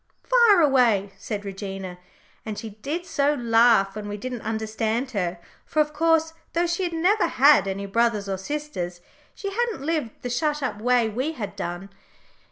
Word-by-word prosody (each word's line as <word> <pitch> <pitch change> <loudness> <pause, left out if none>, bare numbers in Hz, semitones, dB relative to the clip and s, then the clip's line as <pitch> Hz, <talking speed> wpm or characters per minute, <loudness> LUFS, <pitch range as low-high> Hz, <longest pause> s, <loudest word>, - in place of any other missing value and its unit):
"Fire 470 -7 +5
away," 235 -9 +3
said 205 -1 -5
Regina, 195 -2 -6 0.4
and 215 -2 -5
she 225 - -6
did 285 - -5
so 290 -5 +1
laugh 230 -5 +4
when 210 -1 -6
we 205 0 -4
didn't 250 +2 -5
understand 220 +3 -2
her; 180 -5 -2 0.2
for, 310 - -2
of 300 0 +2
course, 325 +1 +2 0.2
though 340 +1 +2
she 345 +2 -1
had 350 -2 -1
never 365 +6 +2
had 275 -7 +5
any 195 +1 -3
brothers 215 0 +1
or 190 -1 -3
sisters, 190 -9 -5 0.3
she 400 -1 -5
hadn't 460 - -2
lived 305 -8 -2
the 245 - -3
shut 295 +3 0
up 215 -5 -3
way 245 -1 +3
we 255 +9 -2
had 205 -8 -6
done. 185 0 -5
235 Hz, 175 wpm, -24 LUFS, 200-300 Hz, 0.4 s, Fire